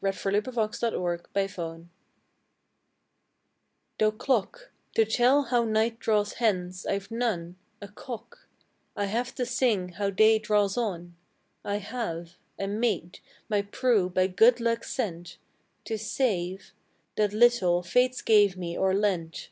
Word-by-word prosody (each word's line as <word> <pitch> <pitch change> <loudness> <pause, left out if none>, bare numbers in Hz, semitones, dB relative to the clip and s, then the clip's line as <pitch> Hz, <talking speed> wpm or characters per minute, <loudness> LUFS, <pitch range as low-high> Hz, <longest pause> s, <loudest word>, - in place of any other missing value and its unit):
HIS 195 -1 -1
GRANGE, 200 +1 +1 0.6
OR 175 -1 -1
PRIVATE 195 -1 -2 0.2
WEALTH - - -14 2.2
Though 215 0 +4
clock, 260 - -2 0.2
To 225 - +4
tell 250 +6 +3
how 245 -3 +1
night 225 +1 0
draws 210 -3 +1
hence, 185 -5 0
I've 195 +1 -2
none, 205 -8 -2 0.3
A - - -7
cock 240 - -10 0.5
I 205 - -1
have 235 +5 -2
to 250 - -1
sing 235 -7 +1
how 200 +3 -2
day 215 +3 +4
draws 210 -2 +1
on: 175 -7 -3 0.5
I 200 - -2
have 180 -6 -5 0.2
A 195 - -3
maid, 200 -4 -2 0.3
my 210 -2 +1
Prue, 205 -2 +1
by 185 0 +2
good 225 +6 +4
luck 230 0 0
sent, 175 -8 -4 0.5
To 220 -1 -3
save 195 -5 -2 0.4
That 210 -1 +1
little, 210 -6 +3
Fates 250 +8 +1
me 210 -2 +7
gave 180 -3 -6
or 190 0 +2
lent. 185 -5 0
205 Hz, 135 wpm, -27 LUFS, 185-235 Hz, 2.2 s, me